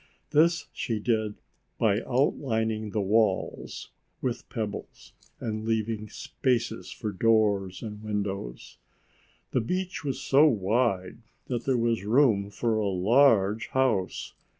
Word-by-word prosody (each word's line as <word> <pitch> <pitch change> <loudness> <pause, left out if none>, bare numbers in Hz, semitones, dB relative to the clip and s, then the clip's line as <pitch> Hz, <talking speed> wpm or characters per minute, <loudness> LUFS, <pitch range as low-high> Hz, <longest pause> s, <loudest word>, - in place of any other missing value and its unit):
This 165 +3 +3
she 115 -4 -2
did 110 -1 0 0.4
by 105 -1 +2
outlining 110 -5 0
the 105 +1 -1
walls 100 0 0 0.3
with 125 -2 -3
pebbles 110 -3 -6 0.3
and 110 -1 -3
leaving 110 -1 -1
spaces 120 -3 -2
for 110 - -4
doors 100 -2 +2
and 105 -2 -7
windows. 100 - -4 0.7
The 125 - +1
beach 180 +9 -3
was 135 -2 -2
so 140 +3 +5
wide 105 -3 0 0.3
that 120 -2 -3
there 130 -2 +2
was 115 -3 0
room 110 -3 +3
for 110 +2 -1
a 105 -2 0
large 105 +1 +3
house. 120 -8 0
110 Hz, 120 wpm, -27 LUFS, 105-125 Hz, 0.7 s, so